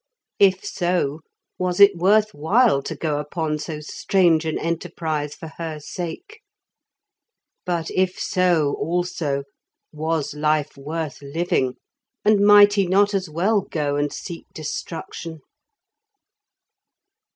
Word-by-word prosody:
If 190 Hz, -1 st, +4 dB
so, 175 Hz, -5 st, -1 dB, 0.4 s
was 180 Hz, 0 st, -1 dB
it 200 Hz, -1 st, +8 dB
worth 210 Hz, +4 st, +3 dB
while 175 Hz, -, +3 dB
to -, -, -5 dB
go 150 Hz, -3 st, -2 dB
upon 150 Hz, +1 st, -3 dB
so 150 Hz, 0 st, -5 dB
strange 165 Hz, +1 st, +2 dB
an 160 Hz, -, -1 dB
enterprise 155 Hz, -2 st, -3 dB
for 160 Hz, -, -9 dB
her 160 Hz, -2 st, -4 dB
sake? 270 Hz, -, -7 dB, 1.3 s
But 170 Hz, -2 st, -2 dB
if 185 Hz, 0 st, 0 dB
so, 175 Hz, -6 st, +1 dB
also, 165 Hz, -4 st, -1 dB, 0.5 s
was 160 Hz, -1 st, -2 dB
life 150 Hz, 0 st, 0 dB
worth 150 Hz, +1 st, -5 dB
living, 140 Hz, -3 st, -1 dB, 0.5 s
and 210 Hz, -1 st, +5 dB
might 205 Hz, 0 st, +8 dB
he 200 Hz, -3 st, +2 dB
not 200 Hz, +3 st, +3 dB
as 190 Hz, -3 st, -1 dB
well 195 Hz, +7 st, +1 dB
go 145 Hz, -5 st, -2 dB
and 145 Hz, 0 st, 0 dB
seek 170 Hz, -3 st, -8 dB
destruction? 160 Hz, 0 st, -6 dB
165 Hz, 120 wpm, -22 LUFS, 150-185 Hz, 1.3 s, it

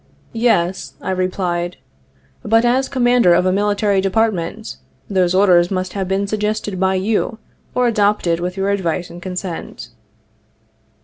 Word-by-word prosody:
' -, -, -33 dB, 0.2 s
Yes/ 180 Hz, -3 st, 0 dB
I -, -, -4 dB
replied, 180 Hz, -1 st, -2 dB, 0.3 s
' -, -, -40 dB, 0.3 s
but, 225 Hz, +1 st, +3 dB
as 260 Hz, +2 st, +2 dB
Commander 245 Hz, -8 st, +4 dB
of 180 Hz, -, +2 dB
a 185 Hz, -, +3 dB
Military 205 Hz, 0 st, +1 dB
Department, 190 Hz, -, -1 dB, 0.3 s
those 185 Hz, -2 st, +1 dB
orders 180 Hz, -3 st, +4 dB
must 185 Hz, -1 st, -3 dB
have 195 Hz, -2 st, -3 dB
been 195 Hz, +1 st, 0 dB
suggested 210 Hz, -1 st, -2 dB
by 190 Hz, 0 st, +2 dB
you, 210 Hz, +3 st, -1 dB, 0.4 s
or 250 Hz, -, +2 dB
adopted 205 Hz, -6 st, +1 dB
with 180 Hz, +2 st, -4 dB
your 195 Hz, +1 st, 0 dB
advice 180 Hz, -3 st, -2 dB
and 175 Hz, -, -10 dB
consent.' 180 Hz, -, -6 dB
190 Hz, 145 wpm, -18 LUFS, 180-210 Hz, 0.4 s, Commander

